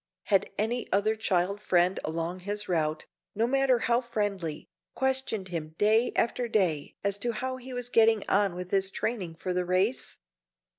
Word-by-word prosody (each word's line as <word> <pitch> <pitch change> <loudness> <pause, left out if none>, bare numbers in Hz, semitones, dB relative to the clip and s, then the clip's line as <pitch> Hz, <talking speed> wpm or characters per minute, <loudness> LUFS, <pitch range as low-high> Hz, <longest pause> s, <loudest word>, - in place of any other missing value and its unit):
Had 195 -3 +2
any 230 +4 -1
other 205 +3 +2
child 200 -2 0
friend 180 -1 +2
along 165 +3 -3
his 205 +2 -3
route, 155 -3 0 0.3
no 225 +3 +2
matter 270 0 +3
how 235 +1 +1
friendly, 205 -9 -3 0.3
questioned 265 -7 -1
him 155 -3 -5
day 220 +3 +3
after 235 +1 +1
day 180 -10 0
as 200 0 0
to 235 +3 0
how 255 +4 -3
he 260 +1 -9
was 245 -1 -4
getting 225 -3 +4
on 200 -3 +2
with 180 0 -6
his 195 -1 +3
training 195 -6 -3
for 180 +2 -3
the 180 0 0
race? 185 +7 0
205 Hz, 165 wpm, -28 LUFS, 180-235 Hz, 0.3 s, getting